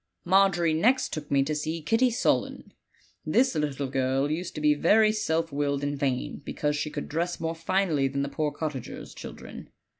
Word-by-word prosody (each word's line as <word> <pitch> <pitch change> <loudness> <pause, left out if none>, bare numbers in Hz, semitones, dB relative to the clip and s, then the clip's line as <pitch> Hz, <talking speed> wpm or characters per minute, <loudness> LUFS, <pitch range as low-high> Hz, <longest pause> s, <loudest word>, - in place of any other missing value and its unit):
f - - -51
"Margery 175 -3 +3
next 255 +11 +2
took 150 -1 -5
me 140 -1 +3
to 155 +3 -2
see 155 +2 -2
Kitty 225 +11 +2
Sullen. 240 - -1 0.5
This 260 +1 +2
little 145 -3 -1
girl 135 +2 0
used 170 +3 -3
to - - -4
be 150 0 +4
very 215 +8 +4
self 165 -6 -1
willed 140 0 -1
and 145 0 -1
vain, 135 -2 -2
because 150 +1 -2
she 150 +1 -2
could 145 -1 -5
dress 170 +3 -2
more 165 0 -2
finely 165 -4 +1
than 140 +1 -2
the - - -2
poor 150 +1 -2
cottagers' 150 -6 -6
children. - - -10
155 Hz, 185 wpm, -27 LUFS, 145-175 Hz, 0.5 s, be